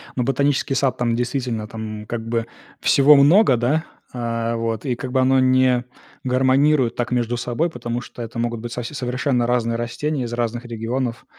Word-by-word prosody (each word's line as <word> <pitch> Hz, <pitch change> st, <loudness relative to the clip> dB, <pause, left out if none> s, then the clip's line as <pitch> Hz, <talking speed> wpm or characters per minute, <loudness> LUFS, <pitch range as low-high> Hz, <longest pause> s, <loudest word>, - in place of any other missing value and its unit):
Но 125 Hz, -, 0 dB
ботанический 135 Hz, +1 st, 0 dB
сад, 135 Hz, -1 st, +1 dB
там, 120 Hz, -1 st, 0 dB
действительно, 120 Hz, -2 st, -2 dB
там, 110 Hz, -1 st, -6 dB
м, -, -, -11 dB
как 115 Hz, 0 st, -5 dB
бы 115 Hz, 0 st, -1 dB, 0.3 s
всего 145 Hz, +2 st, +6 dB
много, 145 Hz, -, +5 dB
да, 145 Hz, +8 st, 0 dB, 0.3 s
а, 115 Hz, -1 st, -2 dB
вот, 115 Hz, 0 st, -3 dB
и 125 Hz, -3 st, 0 dB
как 125 Hz, +1 st, -6 dB
бы 130 Hz, 0 st, +2 dB
оно 130 Hz, +1 st, +4 dB
не 130 Hz, -1 st, +3 dB, 0.4 s
гармонирует 130 Hz, 0 st, +2 dB
так 120 Hz, 0 st, -2 dB
между 120 Hz, -1 st, 0 dB
собой. 125 Hz, +8 st, -1 dB
Потому 120 Hz, -4 st, -4 dB
что 120 Hz, -, -10 dB
это 115 Hz, +1 st, -6 dB
могут 120 Hz, -1 st, -2 dB
быть 120 Hz, +1 st, -7 dB
совсе 120 Hz, +3 st, -5 dB
совершенно 125 Hz, -2 st, -1 dB
разные 115 Hz, -1 st, 0 dB
растения 130 Hz, +4 st, -2 dB
из 120 Hz, -1 st, -5 dB
разных 120 Hz, 0 st, -2 dB
регионов. 120 Hz, +1 st, -3 dB
120 Hz, 185 wpm, -21 LUFS, 115-130 Hz, 0.4 s, всего